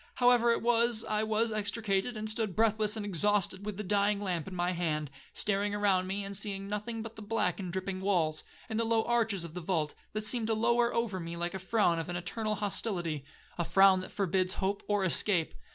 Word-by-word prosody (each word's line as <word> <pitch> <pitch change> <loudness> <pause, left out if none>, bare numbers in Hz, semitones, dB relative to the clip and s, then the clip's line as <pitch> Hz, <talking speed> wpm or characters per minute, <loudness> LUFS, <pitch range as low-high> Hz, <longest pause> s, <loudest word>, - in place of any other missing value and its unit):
However 245 -1 +4
it 230 - 0
was, 235 -1 +3
I 215 0 0
was 220 +1 +1
extricated, 210 +1 -1
and 215 0 -4
stood 215 -4 -2
breathless 220 -1 +2
and 210 - -4
exhausted, 200 +1 0
with 210 -3 -4
the 210 - -4
dying 205 +1 +1
lamp 180 -5 -3
in 190 - -7
my 175 0 0
hand, 155 -5 -2 0.2
staring 205 0 0
around 195 -3 +2
me, 195 +1 -3
and 200 0 -5
seeing 195 -1 -1
nothing 210 +2 -4
but 225 0 -8
the 220 - -10
black 210 -4 -1
and 185 -3 -4
dripping 190 +1 -3
walls, 170 -6 +1 0.2
and 220 -1 -2
the - - +2
low 225 -1 +2
arches 225 -6 0
of 165 - -9
the 180 - -5
vault, 160 -4 -1 0.2
that 215 0 -2
seemed 225 0 0
to 225 - +1
lower 235 +2 +2
over 230 -6 -1
me 170 0 -6
like 175 0 -2
the 190 - -5
frown 190 -3 +1
of 165 - -5
an 175 - -3
eternal 215 +5 -2
hostility,—a 175 -7 -3
frown 195 +1 +5
that 185 - -8
forbids 185 -1 0
hope 200 +1 -1
or 205 -1 +1
escape. 180 -1 +4
200 Hz, 215 wpm, -31 LUFS, 185-220 Hz, 0.2 s, frown